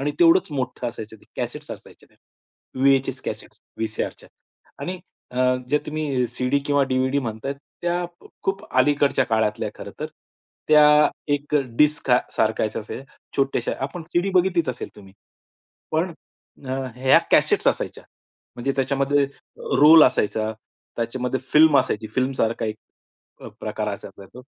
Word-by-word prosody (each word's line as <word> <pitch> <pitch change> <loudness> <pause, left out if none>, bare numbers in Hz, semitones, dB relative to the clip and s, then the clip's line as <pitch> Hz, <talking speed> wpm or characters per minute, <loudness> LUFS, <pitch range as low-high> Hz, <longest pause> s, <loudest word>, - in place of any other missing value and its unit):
आणि 145 +2 0
तेवढंच 170 +1 +5
मोठं 130 -4 -3
असायचं 110 -1 -9
ते. - - -23
कॅसेट्स - - -5
असायच्या - - -11
त्या. - - -30 0.7
VHS 135 -1 +3
cassettes, - - -7 0.2
वी-सी-आरच्या. 110 -1 -4 0.5
आणि 180 0 -4 0.3
अ, 125 - -4 0.3
जे 150 - +4
तुम्ही 150 -5 -1
सीडी 125 +3 0
किंवा 145 -1 +3
डीव्हीडी 130 +2 +1
म्हणताय, 115 +1 -3 0.3
त्या 175 0 0 0.4
खूप 195 0 -2
अलीकडच्या 145 +1 +3
काळातल्या 110 -1 0
आहे - - -11
खरं - - -8
तर. - - -2 0.6
त्या 150 0 +7 0.3
एक 145 +1 -4 0.2
डिस्क 150 -2 +3 0.3
सारखाच 110 0 +1
आहे, 110 +3 -5 0.4
छोट्याश्या. 135 -3 0
आपण 165 +5 -6
सीडी 175 +3 +1
बघितलीच 180 -4 +2
असेल 125 -1 -4
तुम्ही. 95 -2 -14 0.8
पण 165 +3 0 0.8
ह्या 130 +1 +5
कॅसेट्स - - +4
असायच्या. - - -3 0.5
म्हणजे 135 +3 -1
त्याच्यामध्ये 140 +1 +2 0.6
रोल 155 +1 +9
असायचा. 110 +1 +1 0.4
त्याच्यामध्ये 125 +2 -2
फिल्म 150 -2 +7
असायची. 110 -4 -3
फिल्म 130 +1 +1
सारखा 115 -4 0
एक 110 0 -3 0.6
अ, - - -8
प्रकार - - -3
असायचा 100 - -12
तो. 125 +1 -11
135 Hz, 135 wpm, -23 LUFS, 120-150 Hz, 0.8 s, रोल